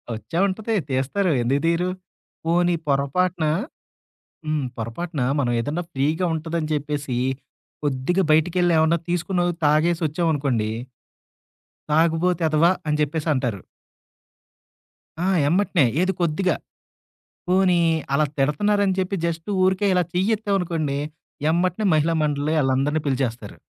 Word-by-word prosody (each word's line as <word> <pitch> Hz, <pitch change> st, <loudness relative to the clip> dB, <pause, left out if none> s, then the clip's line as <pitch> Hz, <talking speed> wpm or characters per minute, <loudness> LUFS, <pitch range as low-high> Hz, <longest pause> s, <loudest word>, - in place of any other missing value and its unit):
వచ్చే 165 Hz, +9 st, -6 dB
ఉంటది. 220 Hz, +3 st, -2 dB
తీస్తారు 140 Hz, +9 st, 0 dB
ఎందుకు 135 Hz, +4 st, +1 dB
తీరు? 170 Hz, +2 st, +1 dB, 0.6 s
పోనీ 175 Hz, +1 st, +2 dB
పొరపాటున 155 Hz, +5 st, +1 dB, 1.0 s
హ్మ్. 155 Hz, -2 st, 0 dB
పొరపాటున 135 Hz, +7 st, -4 dB, 0.2 s
మనం 120 Hz, -3 st, 0 dB
ఏదన్నా 150 Hz, +9 st, -2 dB
ఫ్రీగా 155 Hz, +7 st, 0 dB
ఉంటదని 160 Hz, 0 st, -3 dB
చెప్పేసి, 145 Hz, -3 st, -3 dB, 0.7 s
కొద్దిగా 145 Hz, +6 st, 0 dB
బయటికెళ్ళి 175 Hz, +3 st, +3 dB
ఏమన్నా 160 Hz, +2 st, +3 dB
తీసుకున్న 175 Hz, +1 st, 0 dB, 0.2 s
తాగేసి 160 Hz, +3 st, +2 dB
వచ్చామనుకోండి. 145 Hz, -8 st, 0 dB, 1.2 s
తాగబోతేదవ 165 Hz, 0 st, +2 dB, 0.2 s
అని 150 Hz, 0 st, 0 dB
చెప్పేసి 150 Hz, +2 st, -1 dB
అంటారు. 125 Hz, -8 st, -2 dB, 1.6 s
ఆ! -, -, +1 dB, 0.2 s
ఎమ్మటనే. 180 Hz, -3 st, +2 dB, 0.2 s
ఏది 190 Hz, +1 st, +1 dB
కొద్దిగా. 170 Hz, +1 st, +1 dB, 0.9 s
పోనీ 185 Hz, -1 st, +3 dB, 0.4 s
అలా 150 Hz, +2 st, +3 dB
తిడతన్నారని 195 Hz, +8 st, +1 dB
చెప్పి 190 Hz, +1 st, -1 dB
జస్ట్ 165 Hz, +2 st, -3 dB
ఊరికే 190 Hz, +2 st, +2 dB
ఇలా 180 Hz, -1 st, +3 dB
చెయ్యెత్తామనుకోండి. 180 Hz, -7 st, 0 dB, 0.5 s
ఎమ్మటనే 185 Hz, +4 st, 0 dB
మహిళా 155 Hz, +2 st, +2 dB
మండలి 150 Hz, +1 st, 0 dB
ఆళ్ళందరిని 135 Hz, +3 st, +1 dB
పిలిచేస్తారు. 125 Hz, -6 st, -2 dB
160 Hz, 105 wpm, -23 LUFS, 145-180 Hz, 1.6 s, బయటికెళ్ళి